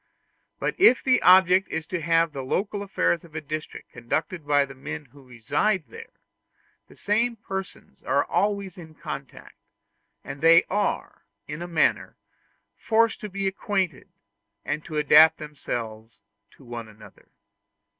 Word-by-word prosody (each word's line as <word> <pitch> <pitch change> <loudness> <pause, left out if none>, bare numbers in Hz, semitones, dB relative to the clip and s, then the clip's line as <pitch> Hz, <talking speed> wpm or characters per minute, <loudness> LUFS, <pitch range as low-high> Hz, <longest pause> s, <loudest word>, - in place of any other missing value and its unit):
But - - -1
if 360 - +6
the 255 -1 +3
object 185 +1 +5
be 160 - -2
to 165 +2 -5
have 165 0 +2
the 135 - -5
local 200 +9 -2
affairs 190 -4 0
of 165 -2 -17
a - - -2
district 155 0 -7
conducted 155 +6 -4
by 145 -1 +3
the 135 - -11
men 150 +3 -7
who 140 +2 -19
reside 155 - -1
there, - - -12 0.7
the - - -18
same 230 +4 0
persons 195 -3 -8
are - - +1
always 200 -3 -1
in 160 -2 -12
contact, 140 -4 -9 0.7
and 135 +1 -8
they 165 +1 +7
are, 205 +1 -2 0.2
in 150 +2 -6
a 175 - -5
manner, 165 -2 0 0.6
forced 230 0 +1
to 210 - -6
be 195 0 -3
acquainted, 190 -5 -2 0.6
and 150 - -3
to 155 - -5
adapt 155 +2 +6
themselves 115 -7 -7 0.4
to - - -18
one 120 -1 -7
another. 105 -2 -17
160 Hz, 145 wpm, -25 LUFS, 140-195 Hz, 0.7 s, they